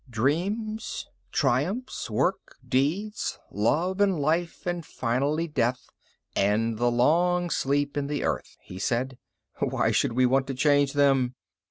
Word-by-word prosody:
"Dreams, 195 - -1 0.2
triumphs, 150 - 0
work, - - -1
deeds, 175 +12 0
love 170 - +1
and 195 -5 +3
life 165 +4 -1
and 175 -1 -2
finally 140 +6 -1
death 125 -5 -1 0.5
and 110 +3 +1
the 120 0 +3
long 175 +8 +2
sleep 145 0 0
in 145 -1 -1
the 145 0 -2
earth," - - -3
he 90 - -10
said. 125 +5 -1 0.4
"Why - - +1
should - - +1
we 130 +1 +3
want 135 +2 +2
to 135 - -3
change 145 0 +3
them? 135 -3 +3
145 Hz, 135 wpm, -27 LUFS, 125-175 Hz, 0.5 s, and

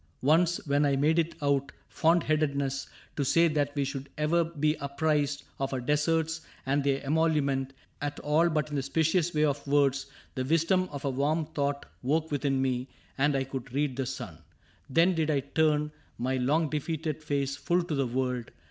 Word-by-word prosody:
^^ - - -37 0.2
Once, 165 +5 +4
when 145 0 +2
I 140 -1 +3
made 155 +4 +3
it 165 0 -1
out 140 0 +1 0.2
fond 165 +1 +2
headedness 140 -3 0 0.3
To 145 - +1
say 165 +5 +4
that 145 -2 0
we 140 - +1
should 135 0 -5
ever 160 +3 +2
be 155 -2 0
apprised 145 0 0 0.2
Of 135 0 -2
our 130 - -1
deserts 160 +4 0 0.2
and 140 +1 +1
their 140 -1 +1
emolument 140 -3 +1 0.3
At 145 0 -3
all 155 +4 +3
but 155 -1 -1
in 145 - -1
the - - +1
specious 160 +5 +1
way 150 -2 +1
of 145 -1 -2
words. 140 -1 +2 0.3
The 130 - -2
wisdom 165 +6 +2
of 140 -1 -6
a 140 - +1
warm 150 +4 0
thought 145 -2 -2 0.2
woke 155 +5 0
within 140 -2 0
me 130 -1 0 0.3
And 145 +1 +2
I 135 - +1
could 135 -1 -7
read 145 -2 0
the 135 -1 -2
sun. 80 -10 -6 0.5
Then 165 +7 +4
did 160 -2 0
I 145 -3 +2
turn 150 +1 +1 0.3
My 130 +2 -1
long 150 +5 +1
defeated 155 0 -2
face 140 -2 -1
full 175 +6 +1
to 170 - -4
the 135 -3 +1
world. 125 -1 -2
145 Hz, 190 wpm, -29 LUFS, 135-160 Hz, 0.5 s, Once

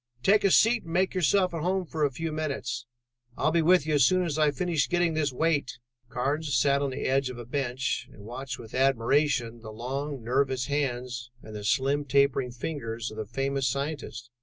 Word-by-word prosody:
"Take 205 +2 +4
a 195 - +5
seat 225 +5 +5
and 165 - -9
make 185 +2 +2
yourself 185 +1 +2
at 165 - -3
home 185 +2 0
for 155 -2 -3
a 145 - +4
few 160 +4 -4
minutes. 140 -6 -3 0.5
I'll 155 - +2
be 170 +1 +3
with 175 -1 +4
you 155 - 0
as 145 -3 +5
soon 185 +7 +4
as 155 -2 -2
I 155 -1 +4
finish 155 +1 0
getting 175 -2 +2
this 155 -2 0
weight." 145 -1 0 0.3
Carnes 140 +2 -1
sat 140 +2 +3
on 140 - 0
the 130 - -4
edge 135 0 +1
of 125 - -7
a 120 - -7
bench 130 0 -2
and 100 - -14
watched 125 +4 -6
with 115 -1 -12
admiration 130 -1 +1
the 110 - -9
long 135 +4 -4
nervous 130 +1 +1
hands 125 -4 -2
and 110 -1 -10
the 105 - -6
slim 135 +7 +1
tapering 140 -1 +2
fingers 120 -4 -4
of 110 - -10
the 110 -2 -4
famous 135 +2 -1
scientist. 140 -3 -4
140 Hz, 205 wpm, -27 LUFS, 125-155 Hz, 0.5 s, a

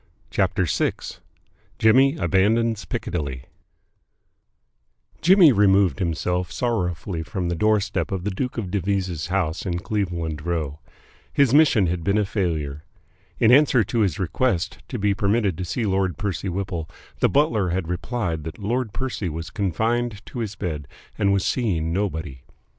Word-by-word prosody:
CHAPTER - - +1
VI - - +1 0.8
JIMMY 135 +6 +5
ABANDONS 110 - +2
PICCADILLY 70 -7 -4 1.8
Jimmy 180 -3 +7
removed 100 -3 +3
himself 90 0 -1
sorrowfully 90 -7 -2
from 90 -1 -3
the 85 - -1
doorstep 105 +3 +1
of 95 -2 -2
the 105 - -1
Duke 125 +7 -3
of 100 -6 -3
Devizes' 95 -4 -1
house 90 -3 -1
in 90 -2 -2
Cleveland 85 -6 -3
Row. 80 -4 -2 0.5
His 140 -3 +3
mission 145 -9 +5
had 85 -1 -2
been 100 +3 +2
a 105 - +2
failure. 80 -8 -2 0.5
In 110 - +4
answer 130 -3 +5
to 105 +4 -2
his 95 -8 +1
request 95 -1 -1
to 125 - -4
be 100 -1 +1
permitted 100 -1 +1
to 90 - -2
see 110 +7 -2
Lord 95 -2 0
Percy 100 -2 -2
Whipple, 90 -3 -3 0.3
the - - +3
butler 115 - +2
had 90 -1 -2
replied 90 -2 -2
that 80 +1 -6
Lord 110 +1 -2
Percy 125 -8 -3
was 80 +1 -6
confined 110 +3 -1
to 125 - -7
his 110 -3 -3
bed 80 -8 -4 0.3
and 100 -1 +2
was 100 -1 +1
seeing 85 -10 0
nobody. 80 -9 -3
95 Hz, 145 wpm, -23 LUFS, 85-110 Hz, 1.8 s, Jimmy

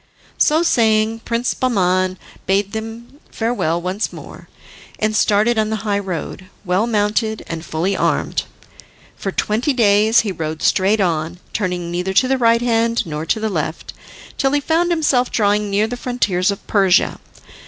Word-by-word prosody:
So 315 +3 +3
saying, 225 -6 +2
Prince 235 +1 -1
Bahman 185 -6 +1 0.3
bade 195 +1 +1
them 225 +5 -7
farewell 225 -8 -1
once 185 +4 -3
more, - - -12 0.5
and 215 0 0
started 215 +3 +2
on 215 0 +1
the 220 - -1
high 200 -1 +1
road, 185 -1 -5 0.2
well 185 +5 +1
mounted 215 0 0
and 165 -1 -6
fully 175 +5 -1
armed. - - 0 0.7
For 195 - -4
twenty 225 +9 0
days 215 -1 +4
he 210 - -3
rode 160 -2 -5
straight 200 +2 +2
on, 165 -1 -1 0.2
turning 180 -4 -2
neither 180 +2 -2
to 255 - +4
the 265 0 +1
right 230 0 +3
hand 230 -1 +1
nor 155 0 -5
to 220 - +1
the 220 - -1
left, 160 -5 -4 0.5
till 270 0 +1
he 290 - +3
found 330 +4 +1
himself 290 -7 +1
drawing 210 -1 +1
near 200 +2 +2
the 235 +3 -4
frontiers 210 -8 0
of 200 - -4
Persia. 190 -3 +2
210 Hz, 160 wpm, -19 LUFS, 185-230 Hz, 0.7 s, days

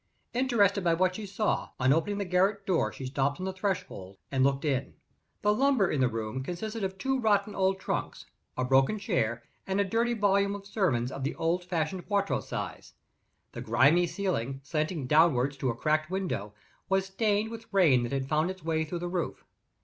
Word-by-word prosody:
Interested 225 -6 +2
by 170 -1 +3
what 185 +1 +2
she 210 +2 -6
saw, 200 +2 -1
on 130 +1 +4
opening 185 +6 0
the 200 - -2
garret 195 +3 +1
door, 185 -5 +1
she 135 - -8
stopped 140 +3 -1
on 185 - -3
the 190 - -3
threshold 180 - -4
and 135 -1 +2
looked 140 +2 +1
in. 140 -2 -1 0.5
The 210 0 +4
lumber 260 -5 +3
in 140 - 0
the 130 - +4
room 115 +2 -3
consisted 215 - -4
of 190 0 -3
two 265 +6 0
rotten 210 -3 +2
old 190 0 +1
trunks, - - -3 0.3
a 130 - 0
broken 135 +10 +3
chair, 120 - -1 0.2
and 190 +1 0
a - - +4
dirty 230 +4 +1
volume 200 -1 +2
of 200 -1 -9
sermons 135 - 0
of 135 - -5
the 140 - -2
old 170 +2 0
fashioned 175 0 -2
quarto 200 -1 +1
size. - - -6 0.6
The - - -7
grimy 140 +10 +4
ceiling, 135 - -2
slanting 155 0 -2
downward 140 -2 +4
to 130 - 0
a 115 - -1
cracked 155 +4 0
window, 175 - -3 0.3
was 190 0 +2
stained 210 +2 0
with 230 0 -9
rain 165 -11 +5
that 120 - -3
had 135 -1 -2
found 155 +4 +1
its 185 -2 -7
way 160 -1 0
through 160 +3 -4
the 175 +1 -4
roof. 175 -1 -3
180 Hz, 195 wpm, -29 LUFS, 135-200 Hz, 0.6 s, rain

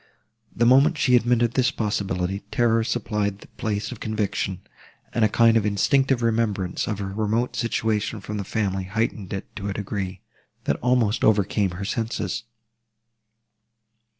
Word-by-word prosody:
The 120 - +2
moment 135 +7 +5
she 125 -4 +4
admitted 120 -1 +3
this 130 0 +2
possibility, 100 - -2
terror 115 -1 +2
supplied 105 -3 -1
the - - -15
place 105 +1 -3
of 125 - -8
conviction, 110 -2 -2 0.5
and 115 - +2
a 110 - +5
kind 115 +1 +4
of 115 - +3
instinctive 125 +5 +2
remembrance 110 -5 0
of 105 - -2
her 95 -1 -4
remote 110 +4 0
situation 110 -2 -1
from 105 +2 -5
the 100 - -2
family 95 -1 -1
heightened 105 -1 -2
it 95 - -6
to 100 -1 -4
a - - -2
degree, 95 -2 -4 0.4
that - - 0
almost 125 -3 +1
overcame 105 -1 +3
her 100 - -4
senses. 115 0 -2
110 Hz, 150 wpm, -24 LUFS, 100-120 Hz, 0.5 s, moment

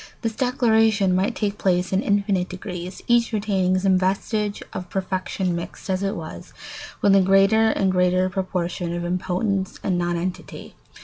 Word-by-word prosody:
This 225 -1 -1
declension 220 -6 +2
might 190 +2 0
take 205 -1 -2
place 180 0 +1
in 190 - +2
infinite 200 -3 0
degrees, 180 -1 -7
each 240 0 +3
retaining 195 -4 +1
some 185 0 +3
vestige 200 +2 -1
of 180 -1 -6
perfection 185 -1 -2
mixed, 170 +3 -6
as 185 0 0
it 195 0 -1
were, 155 - -7 0.6
with 200 -1 +5
a 195 - +6
greater 195 +4 +4
and 195 -3 +1
greater 180 0 +2
proportion 180 -2 -3
of 175 0 -3
impotence 190 +2 -1
and 180 -2 0
nonentity. 175 +1 -4
190 Hz, 150 wpm, -23 LUFS, 180-205 Hz, 0.6 s, a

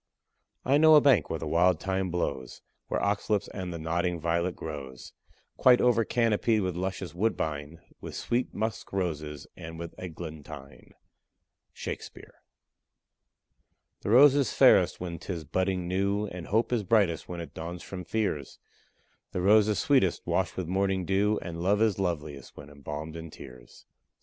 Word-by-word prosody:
I 140 +3 +4
know 155 0 +8
a - - +9
bank 130 - +4
where 80 - -2
the 80 - -6
wild 85 +2 +3
thyme 95 +1 -1
blows, 75 -7 -3 0.2
Where - - -1
ox 100 +2 -1
lips 105 -2 +1
and 95 -2 -5
the 85 - -5
nodding 85 +2 -1
violet 85 +2 0
grows, 70 -5 -8 0.4
Quite 125 -1 +6
over 120 -2 +3
canopied 115 -1 +1
with 90 -2 -2
luscious 95 -2 -4
woodbine, 80 -6 -2 0.2
With - - -7
sweet 120 +2 -1
musk 110 +1 -4
roses 75 -6 -3
and 80 0 -9
with 85 0 -7
eglantine. 80 -5 -9 0.8
SHAKESPEARE. - - -7 1.7
The - - -4
rose 135 +5 +8
is 140 -5 +1
fairest - - +5
when 85 -2 -5
'tis 85 -2 -5
budding 95 +3 -1
new, 100 +3 0
And 90 -4 -7
hope 115 +4 +1
is 120 - +2
brightest 100 -5 +1
when 90 -1 -5
it 85 - -8
dawns 85 +2 -6
from 95 -2 -7
fears; 90 -7 -2 0.8
The 90 - -1
rose 105 +2 +5
is 105 -2 +1
sweetest 130 -11 +2
washed 95 -2 -1
with 95 - -2
morning 95 0 0
dew, 100 +3 +2
And 85 -1 -6
love 100 +3 +2
is 110 -3 +2
loveliest 75 -6 -4
when 70 0 -11
embalmed 75 +2 -7
in 80 0 -7
tears. 60 -4 -13
90 Hz, 160 wpm, -28 LUFS, 80-105 Hz, 1.7 s, a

